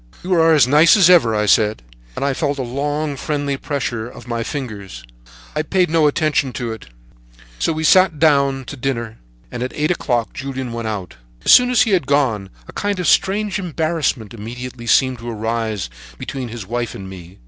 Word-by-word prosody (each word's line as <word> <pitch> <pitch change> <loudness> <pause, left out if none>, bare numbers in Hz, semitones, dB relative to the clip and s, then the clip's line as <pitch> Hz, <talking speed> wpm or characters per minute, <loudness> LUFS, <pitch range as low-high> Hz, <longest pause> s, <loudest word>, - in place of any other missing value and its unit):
"'You 185 +1 -1
are 165 -2 +5
as 135 -5 +5
nice 155 - +6
as 180 -3 +6
ever, 120 -11 +5
I 105 0 +1
said, 105 - +2 0.3
and - - -2
I 140 - +1
felt 145 +1 -1
a 135 - -2
long, 145 +4 -2
friendly 145 0 -2
pressure 130 -5 -3
of 120 -1 -13
my 115 -1 -2
fingers, 105 - -6 0.2
but - - -22 0.2
I 150 - +1
paid 180 +1 +1
no 160 -2 +4
attention 145 -3 0
to 120 -2 -4
it; 110 - -11 0.7
so - - +1
we 160 0 -3
sat 185 0 +5
down 140 -4 +2
to 145 - -7
dinner, 115 -4 -4 0.3
and 125 - -6
at 125 - -3
eight 150 +3 0
o'clock 120 -9 -1
Julien 130 -2 -5
went 115 -1 -4
out. 95 - -5 0.3
"As - - +5
soon 250 0 +7
as 250 -2 +4
he 225 - -1
had 175 -9 +1
gone, 120 -9 +1 0.2
a - - -11
kind 205 -2 -2
of 180 - -2
strange 205 +1 +2
embarrassment 155 - -2
immediately 120 +2 -8
seemed 130 +1 +3
to 120 +1 -7
arise 110 - -2 0.3
between 135 - -5
his 115 -3 -7
wife 120 +2 -3
and 95 - -8
me. 90 -1 -11
135 Hz, 200 wpm, -19 LUFS, 115-155 Hz, 0.7 s, soon